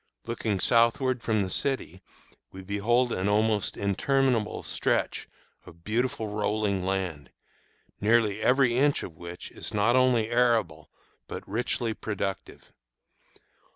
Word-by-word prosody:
Looking 110 Hz, -4 st, -2 dB
southward 120 Hz, +4 st, +2 dB
from 110 Hz, -2 st, +1 dB
the 95 Hz, -, -2 dB
city 110 Hz, -, -2 dB, 0.5 s
we 95 Hz, 0 st, -10 dB
behold 115 Hz, +6 st, +1 dB
an 95 Hz, 0 st, 0 dB
almost 105 Hz, -1 st, +1 dB
interminable 115 Hz, +3 st, 0 dB
stretch -, -, -1 dB, 0.3 s
of 85 Hz, 0 st, -16 dB
beautiful 115 Hz, +1 st, -1 dB
rolling 105 Hz, -2 st, -1 dB
land, 90 Hz, -8 st, -3 dB, 0.7 s
nearly 110 Hz, -1 st, +2 dB
every 125 Hz, 0 st, +3 dB
inch 145 Hz, +3 st, +2 dB
of 85 Hz, -, -8 dB
which 85 Hz, +2 st, -9 dB
is -, -, -6 dB
not 110 Hz, +4 st, +3 dB
only 125 Hz, -3 st, +3 dB
arable 115 Hz, -11 st, +1 dB, 0.4 s
but -, -, -7 dB
richly 115 Hz, +1 st, -1 dB
productive. 100 Hz, -3 st, -5 dB
110 Hz, 120 wpm, -27 LUFS, 95-120 Hz, 0.7 s, every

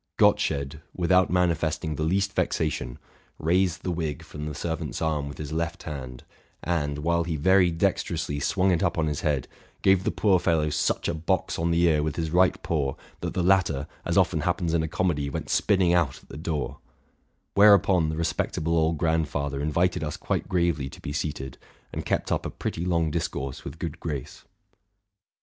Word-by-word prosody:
Gottsched, 70 Hz, +1 st, +2 dB, 0.2 s
without 90 Hz, +1 st, +3 dB
manifesting 80 Hz, -3 st, +1 dB
the 75 Hz, -, -5 dB
least 95 Hz, +5 st, +1 dB
vexation, 75 Hz, -6 st, -1 dB, 0.4 s
raised 90 Hz, +2 st, +1 dB
the 90 Hz, -, -1 dB
wig 80 Hz, -5 st, -3 dB
from 75 Hz, 0 st, -7 dB
the 75 Hz, -, -5 dB
servant's 80 Hz, 0 st, -3 dB
arm 75 Hz, -3 st, -1 dB
with 70 Hz, -, -8 dB
his 75 Hz, -1 st, -6 dB
left 85 Hz, +2 st, -2 dB
hand, 65 Hz, -5 st, -7 dB, 0.4 s
and, 75 Hz, -4 st, -1 dB
while 85 Hz, +3 st, +1 dB
he 85 Hz, -1 st, -2 dB
very 95 Hz, +4 st, +4 dB
dexterously 80 Hz, -3 st, -1 dB
swung 95 Hz, +6 st, +2 dB
it 85 Hz, -, +1 dB
up -, -, +1 dB
on 80 Hz, -, +2 dB
his 75 Hz, -2 st, -2 dB
head, 70 Hz, -5 st, 0 dB, 0.4 s
gave 95 Hz, -1 st, +4 dB
the -, -, +1 dB
poor 95 Hz, -4 st, +3 dB
fellow 80 Hz, -3 st, +1 dB
such 75 Hz, -, 0 dB
a -, -, 0 dB
box 85 Hz, +3 st, -1 dB
on 85 Hz, +1 st, +1 dB
the 85 Hz, +1 st, +2 dB
ear 80 Hz, -3 st, +4 dB
with 75 Hz, -1 st, -2 dB
his 80 Hz, -2 st, -2 dB
right 90 Hz, +1 st, +3 dB
paw, 70 Hz, -5 st, -1 dB, 0.2 s
that -, -, -4 dB
the 90 Hz, -, +1 dB
latter, 85 Hz, -7 st, +3 dB, 0.2 s
as -, -, -1 dB
often -, -, +3 dB
happens 85 Hz, -2 st, 0 dB
in 85 Hz, -, +3 dB
a 80 Hz, -, -1 dB
comedy, 80 Hz, -4 st, 0 dB
went -, -, -4 dB
spinning 95 Hz, -4 st, +3 dB
out 85 Hz, -7 st, +2 dB
at -, -, -23 dB
the -, -, -9 dB
door; 80 Hz, -1 st, -3 dB, 0.7 s
whereupon 100 Hz, -5 st, +6 dB
the 80 Hz, -, -3 dB
respectable 80 Hz, +1 st, -1 dB
old 80 Hz, 0 st, +2 dB
grandfather 75 Hz, -3 st, 0 dB
invited 80 Hz, +3 st, +1 dB
us 75 Hz, -1 st, -3 dB
quite -, -, -2 dB
gravely 85 Hz, -7 st, +1 dB
to -, -, -12 dB
be 70 Hz, -, -5 dB
seated, 70 Hz, -4 st, -4 dB, 0.3 s
and -, -, -4 dB
kept -, -, 0 dB
up -, -, +1 dB
a -, -, -3 dB
pretty 80 Hz, -, -4 dB
long 85 Hz, -3 st, +1 dB
discourse 70 Hz, -5 st, -3 dB
with -, -, -7 dB
good 85 Hz, 0 st, -5 dB
grace. 75 Hz, -7 st, -6 dB
80 Hz, 185 wpm, -26 LUFS, 75-85 Hz, 0.7 s, whereupon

